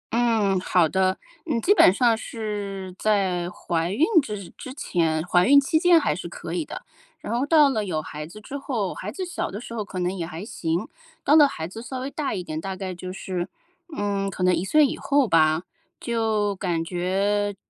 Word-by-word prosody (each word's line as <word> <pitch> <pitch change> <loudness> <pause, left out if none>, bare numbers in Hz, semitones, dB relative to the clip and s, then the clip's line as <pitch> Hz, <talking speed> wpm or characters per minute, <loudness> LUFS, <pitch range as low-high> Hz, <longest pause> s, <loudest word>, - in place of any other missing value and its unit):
嗯， 220 -5 +2
好 180 -2 +3
的。 185 +3 +1 0.3
嗯， 260 -7 0
基 400 - +4
本 185 - +7
上 230 +3 +3
是 200 -4 -5
在 190 -5 +1
怀 175 -3 -2
孕 290 +11 +3 0.2
之 210 -7 -6
之 255 - -9
前， 165 - 0
怀 180 0 +3
孕 280 +2 +8
期 315 +3 +1
间 345 0 +6
还 - - 0
是 - - -6
可 - - -7
以 335 - -1
的， - - -8 0.3
然 - - -5
后 260 +4 0
到 300 -2 +6
了 215 -4 -1
有 170 -6 -2
孩 150 0 -7
子 200 +6 -12
之 245 +6 -9
后， 230 -9 -2
孩 205 - -6
子 370 - -4
小 355 -1 -3
的 205 - -6
时 235 - -9
候 220 - -2
可 200 -2 -9
能 180 +1 -1
也 175 - -3
还 170 +4 -7
行。 170 +1 -2 0.4
到 295 - +4
了 295 -2 +8
孩 160 -12 -5
子 225 +5 -9
稍 260 +2 -6
微 265 +2 -4
大 290 -6 -2
一 180 - -4
点， 155 -2 -5
大 190 +1 -4
概 185 0 -5
就 180 +1 -7
是， 185 -2 -4 0.5
嗯， 200 -1 -1
可 185 -1 -4
能 180 0 +4
1 175 - -1
岁 300 +8 +4
以 - - -2
后 280 -3 +2
吧， 160 0 +3 0.4
就 220 -4 0
感 170 -3 -1
觉 195 +4 0
200 Hz, 225 characters per minute, -24 LUFS, 180-240 Hz, 0.5 s, 孕